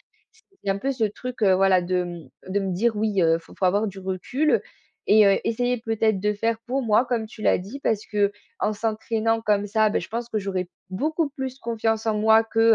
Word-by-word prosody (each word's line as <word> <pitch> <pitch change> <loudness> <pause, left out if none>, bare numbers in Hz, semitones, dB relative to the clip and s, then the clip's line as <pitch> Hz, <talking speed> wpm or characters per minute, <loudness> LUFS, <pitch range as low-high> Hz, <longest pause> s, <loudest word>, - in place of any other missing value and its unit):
heu, 440 -3 -32
c'est 200 - 0
un 195 - +1
peu 270 +6 -1
ce 245 -4 0
truc, 245 +4 -5
heu, 190 -2 +5
voilà 190 -1 +4
de, 180 0 0
mmh, 175 -5 -8 0.2
de 200 +2 0
me 195 -1 -2
dire: 220 +6 +1
«Oui, 210 -3 +1
heu, 165 0 +4
faut 165 - -16
faut - - 0
avoir 200 +4 +2
du 195 -2 -6
recul» 190 +11 0 0.5
et 215 0 +7
heu, 195 - +4
essayer 245 +2 0
peut-être 225 -3 0
de 210 +2 +1
faire 225 +2 -1
pour 265 +2 -1
moi 225 +1 +3
comme 235 -2 -1
tu 220 0 -14
l'as - - +4
dit, 205 +10 -8
parce 220 -6 0
qu'en 205 0 -1
s'entraînant 225 +1 -1
comme 205 -2 +1
ça, 215 +1 +3
beh, - - +1
je 170 - -8
pense 235 +2 -3
que 220 - -1
j'aurais 190 -3 -3 0.2
beaucoup 310 - -1
plus 265 -2 -5
confiance 225 -2 -1
en 220 -1 +1
moi 220 +1 +5
que, 225 0 -1
215 Hz, 225 wpm, -24 LUFS, 195-230 Hz, 0.5 s, et